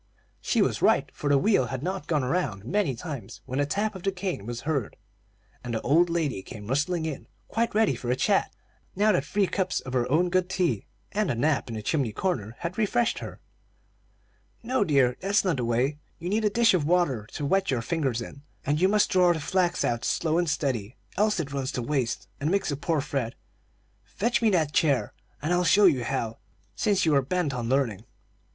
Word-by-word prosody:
She - - +2
was - - -1
right, - - +4
for 145 - -3
the 140 - +5
wheel 135 - +3
had 130 +2 -5
not 185 +2 -3
gone 150 -5 +1
around 125 - -1
many 175 - 0
times, 130 - -7
when 130 +2 -3
the 145 - +1
tap 210 +7 -1
of 190 - -8
the 195 - 0
cane 180 - -4
was 120 0 -4
heard, 140 -6 -2 0.7
and 120 -1 -3
the 110 - -2
old 165 +6 +3
lady 160 - -1
came 105 0 -10
rustling 150 - 0
in, 155 -3 -5 0.2
quite 230 -1 -1
ready 220 0 +4
for 120 - -5
a 125 - +3
chat, - - +1 0.4
now 210 +2 +4
that 180 -8 +1
three 195 +7 +1
cups 185 -1 -1
of 130 - -8
her 125 -1 +1
own 175 +4 +3
good 185 0 +1
tea 175 - 0 0.2
and 210 -2 0
a - - 0
nap 140 +2 +1
in 115 - -4
the 110 - -5
chimney 135 -3 0
corner 115 - -2
had 175 +4 -4
refreshed 230 +2 +1
her. - - -8 1.2
"No, 245 -1 +1
dear, 135 -8 +2
that's 200 +1 +1
not 175 -6 +1
the 125 - -1
way; 125 +6 0 0.2
you 170 +2 -5
need 215 +2 +1
a - - +4
dish 230 +1 +4
of 180 -5 +2
water 145 -10 +1
to 145 - -3
wet 195 +5 +1
your 125 -4 0
fingers 135 -7 -1
in, 140 - -11 0.2
and 150 +3 0
you 185 - +6
must 210 0 +3
draw 180 -1 +5
the 160 - -4
flax 175 +3 +1
out 120 -1 -1
slow 165 0 +1
and 175 -2 0
steady, 130 -7 -2 0.2
else 210 +2 +2
it 140 -1 -4
runs 135 -1 -2
to 125 - -2
waste, 120 -7 -1
and 145 - 0
makes 195 -3 +1
a - - -1
poor 155 +2 0
thread. 135 -5 -3 0.7
Fetch 220 - -1
me 225 - +4
that 160 -7 +1
chair, 145 -5 +2 0.3
and 165 +4 +1
I'll 175 0 +2
show 200 +4 +5
you 140 -9 +4
how, 115 -1 -3 0.4
since 195 - +1
you 160 - +3
are 140 - +5
bent 155 +1 -1
on 120 -2 -3
learning." 120 -6 0
150 Hz, 215 wpm, -27 LUFS, 125-185 Hz, 1.2 s, you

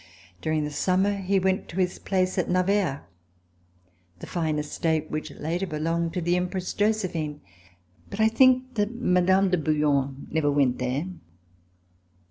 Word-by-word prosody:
During 155 -1 0
the 150 - -3
summer 190 +6 +1
he 195 0 0
went 190 0 0
to 170 - -8
his 180 -1 0
place 185 -1 0
at 180 - -1
Navarre, 185 -5 +1 1.1
the - - -9
fine 160 -3 -1
estate 155 +1 -1
which 155 +1 -3
later 170 +5 -3
belonged 165 +1 -1
to 180 - -1
the 175 +1 +1
Empress 180 0 -2
Josephine. 185 -8 -1 0.7
But 200 - -7
1 220 0 +4
think 255 +1 +4
that 205 -3 0
Mme. 185 -3 +3
de 180 - +2
Bouillon 145 -3 0
never 155 -2 +1
went 135 -3 +2
there. 130 +5 -1
175 Hz, 145 wpm, -26 LUFS, 155-190 Hz, 1.1 s, 1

